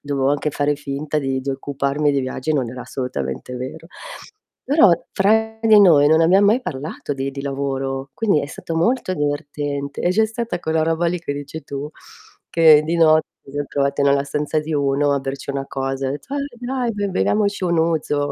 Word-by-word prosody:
dovevo 140 -2 0
anche 145 +1 0
fare 145 +1 0
finta 145 +1 -3
di 135 -2 -1
di 135 - -2
occuparmi 140 +2 -1
di 140 -1 +1
viaggi, 130 +4 -2
non 130 -5 -1
era 125 +1 -8
assolutamente 125 - -5
vero. 150 +6 -7 0.8
Però, 285 - +5 0.2
fra 220 +3 +2
di 220 -1 +6
noi 155 -7 +6
non 160 +1 +4
abbiamo 190 +5 +5
mai 230 +5 +3
parlato 145 - -5
di 135 0 -3
di 140 0 -7
lavoro, 135 -1 -3
quindi 205 -9 +2
è - - -4
stato 165 +3 -7
molto 230 +3 +1
divertente, 145 -2 -3
e 175 - +1
c'è 215 +5 +3
stata 225 -2 -3
quella 160 -1 -1
roba 165 +2 +1
lì 175 +1 0
che 155 -4 -4
dici 145 +2 -7
tu, 140 +1 -6 0.6
che 160 -2 +6
di 165 +2 -1
notte 155 -1 +4 0.2
mi 135 - -12
son 145 0 -2
trovata 140 0 0
nella 140 0 +3
stanza 150 +2 -1
di 155 +1 -4
uno 140 0 +1
a 140 - +1
berci 135 +1 -5
una 135 0 -3
cosa, 135 0 -3
ha - - -2
etto: 150 - -7
"Eh, 280 -3 -4
dai! 245 -1 -2
Be 205 -1 -2
beviamoci 200 +1 0
un 170 -2 +1
Ouzo, 155 -3 0
145 Hz, 195 wpm, -20 LUFS, 140-170 Hz, 0.8 s, di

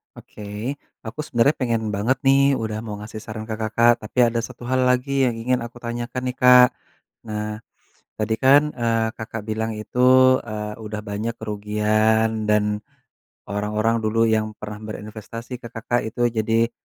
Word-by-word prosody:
Oke - - -13 0.6
aku 110 +7 -8
sebenarnya 130 +5 +2
pengen 115 -4 0
banget 120 +6 +1
nih 140 0 +5
udah 110 -2 -3
mau 105 -2 -5
ngasih 110 +1 -8
saran 110 0 -6
ke 110 - -3
Kakak 115 +2 +3
tapi 110 - -11
ada 115 0 -1
1 125 0 -9
hal 130 0 +2
lagi 135 +2 +2
yang 120 - -1
ingin 125 +2 +1
aku 120 +1 -9
tanyakan 120 +2 -4
nih 125 - -3
Kak, 125 -1 +8 0.6
nah 105 0 -4 0.6
tadi 110 +1 0
kan, 140 +2 +6
eee, 115 -2 +1
Kakak 110 -1 -6
bilang 110 +1 -2
itu, 125 +3 -4 0.4
eee, 105 -2 -5
udah 105 0 -5
banyak 105 +3 -3
kerugian 110 +1 +1
dan, 105 0 +2 0.7
orang-orang 105 +3 0
dulu 115 +1 +2
yang 110 -1 0
pernah 105 0 -7
berinvestasi 110 +3 -8
ke 120 - -7
Kakak 120 +2 0
itu 115 +2 -5
jadi 115 0 +1
110 Hz, 155 wpm, -22 LUFS, 105-120 Hz, 0.7 s, Kak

